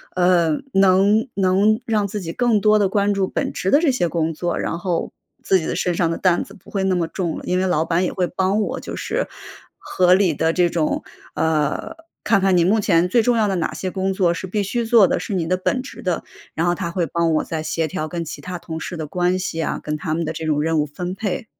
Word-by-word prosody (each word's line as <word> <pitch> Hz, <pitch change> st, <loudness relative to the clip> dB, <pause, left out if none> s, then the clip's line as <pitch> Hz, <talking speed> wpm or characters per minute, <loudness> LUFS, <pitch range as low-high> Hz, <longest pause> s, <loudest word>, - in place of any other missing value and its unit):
呃， 175 Hz, -2 st, +3 dB, 0.2 s
能 195 Hz, +4 st, +4 dB
能 200 Hz, +3 st, +3 dB
让 215 Hz, -3 st, +1 dB
自 205 Hz, +2 st, -4 dB
己 165 Hz, -2 st, -5 dB
更 240 Hz, -3 st, +2 dB
多 215 Hz, +1 st, +5 dB
的 205 Hz, -2 st, +3 dB
关 205 Hz, +1 st, +1 dB
注 195 Hz, -1 st, 0 dB
本 -, -, -2 dB
职 190 Hz, -, -1 dB
的 285 Hz, -, +6 dB
这 310 Hz, -, +3 dB
些 245 Hz, -9 st, 0 dB
工 165 Hz, -1 st, -1 dB
作， 175 Hz, +2 st, -2 dB
然 -, -, -2 dB
后 175 Hz, -2 st, -2 dB, 0.3 s
自 190 Hz, -, +3 dB
己 160 Hz, -, -5 dB
的 -, -, -2 dB
身 175 Hz, -1 st, 0 dB
上 165 Hz, -1 st, +1 dB
的 -, -, -2 dB
担 180 Hz, -2 st, +2 dB
子 -, -, -14 dB
不 190 Hz, -, -17 dB
会 195 Hz, -2 st, -2 dB
那 190 Hz, -1 st, +1 dB
么 170 Hz, -2 st, 0 dB
重 170 Hz, -2 st, -3 dB
了， -, -, -8 dB
因 180 Hz, -, 0 dB
为 185 Hz, -, +1 dB
老 160 Hz, -3 st, +1 dB
板 170 Hz, +2 st, +1 dB
也 -, -, -1 dB
会 180 Hz, -2 st, 0 dB
帮 190 Hz, +4 st, 0 dB
我 -, -, -2 dB
就 -, -, -7 dB
是 -, -, -2 dB, 0.5 s
合 180 Hz, -1 st, +2 dB
理 190 Hz, -4 st, +2 dB
地 160 Hz, +3 st, +1 dB
这 180 Hz, 0 st, +3 dB
种 165 Hz, -2 st, -1 dB, 0.3 s
呃， 155 Hz, -2 st, 0 dB, 0.3 s
看 200 Hz, -, +3 dB
看 190 Hz, -1 st, +3 dB
你 170 Hz, -, +4 dB
目 210 Hz, +5 st, +3 dB
前 180 Hz, -4 st, +3 dB
最 235 Hz, +5 st, +4 dB
重 235 Hz, +1 st, +2 dB
要 215 Hz, -, +2 dB
的 195 Hz, -, 0 dB
哪 165 Hz, -, -1 dB
些 185 Hz, -, -4 dB
工 190 Hz, 0 st, -1 dB
作 180 Hz, -3 st, +2 dB
是 190 Hz, -, -6 dB
必 205 Hz, +2 st, -1 dB
须 235 Hz, +5 st, -1 dB
做 225 Hz, -4 st, +6 dB
的， -, -, 0 dB
是 210 Hz, -, -5 dB
你 175 Hz, -3 st, 0 dB
的 185 Hz, -, +2 dB
本 250 Hz, +7 st, -1 dB
职 275 Hz, -, -10 dB
的， 180 Hz, -3 st, -1 dB, 0.3 s
然 165 Hz, -, 0 dB
后 175 Hz, -, +2 dB
他 170 Hz, -, -3 dB
会 170 Hz, -1 st, 0 dB
帮 165 Hz, +2 st, 0 dB
我 -, -, +1 dB
再 160 Hz, -1 st, -4 dB
协 160 Hz, 0 st, -1 dB
调 155 Hz, +1 st, -4 dB
跟 170 Hz, +1 st, -4 dB
其 155 Hz, -, -7 dB
他 180 Hz, 0 st, -5 dB
同 160 Hz, -1 st, -6 dB
事 175 Hz, -, -6 dB
的 160 Hz, -, -4 dB
关 180 Hz, +3 st, 0 dB
系 165 Hz, -3 st, -3 dB
啊， -, -, -2 dB
跟 150 Hz, -, -2 dB
他 155 Hz, +1 st, -3 dB
们 165 Hz, 0 st, -1 dB
的 160 Hz, -, -3 dB
这 160 Hz, -, -5 dB
种 150 Hz, -2 st, +1 dB
任 160 Hz, 0 st, +1 dB
务 150 Hz, -, +1 dB
分 180 Hz, +5 st, -5 dB
配。 200 Hz, +1 st, -3 dB
180 Hz, 285 characters per minute, -21 LUFS, 165-195 Hz, 0.5 s, 的